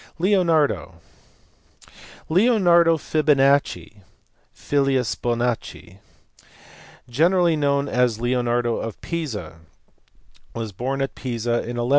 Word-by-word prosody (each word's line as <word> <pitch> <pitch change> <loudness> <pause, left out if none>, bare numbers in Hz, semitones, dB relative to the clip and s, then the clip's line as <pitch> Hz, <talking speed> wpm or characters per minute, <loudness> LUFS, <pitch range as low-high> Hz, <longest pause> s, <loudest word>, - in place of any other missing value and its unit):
Leonardo*. 160 - +1 1.3
Leonardo 175 -4 +4
Fibonacci 140 -7 +1
(i.e. - - -20 0.5
filius 135 -4 0
Bonaccii) 120 -6 -3 1.1
gene 160 +10 +2
rally 175 -3 +3
known 140 -1 0
as 125 -4 0
Leonardo 120 -1 0
of 115 - -6
Pisa, 115 - -5 1.0
was 115 -2 -5
born 135 +7 -3
at 135 - -4
Pisa 120 -2 -5 0.2
in 120 - -5
1175. 120 +1 -2
135 Hz, 95 wpm, -22 LUFS, 120-160 Hz, 1.3 s, Leonardo